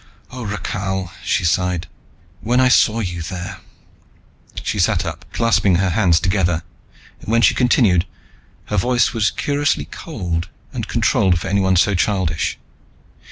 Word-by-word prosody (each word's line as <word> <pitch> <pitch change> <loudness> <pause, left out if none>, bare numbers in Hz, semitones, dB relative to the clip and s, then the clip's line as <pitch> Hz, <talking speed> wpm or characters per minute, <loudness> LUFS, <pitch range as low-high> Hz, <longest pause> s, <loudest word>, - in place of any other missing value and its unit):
"O, 125 -1 -7
Rakhal," 95 -2 -3
she 90 - 0
sighed. 90 0 0 0.5
"When 120 +5 +1
I 130 0 +5
saw 115 -2 +4
you 90 -4 -4
there 95 +3 -6 0.5
" - - -14
She 105 - -2
sat 90 0 +2
up, 80 -1 -6
clasping 115 -5 +2
her 95 +1 +1
hands 95 -4 +3
hard - - -2
together, 90 -3 +1 0.6
and 90 - -10
when 115 +1 +3
she - - +5
continued 110 - +3 0.6
her 105 - -3
voice 120 +3 +2
was 110 -3 +2
curiously 145 0 -1
cold 90 - -4 0.2
and - - -4
controlled 90 -2 +2
for 95 - -5
anyone 95 -1 +2
so 100 +3 +3
childish. 90 -4 0
95 Hz, 150 wpm, -19 LUFS, 90-110 Hz, 0.6 s, I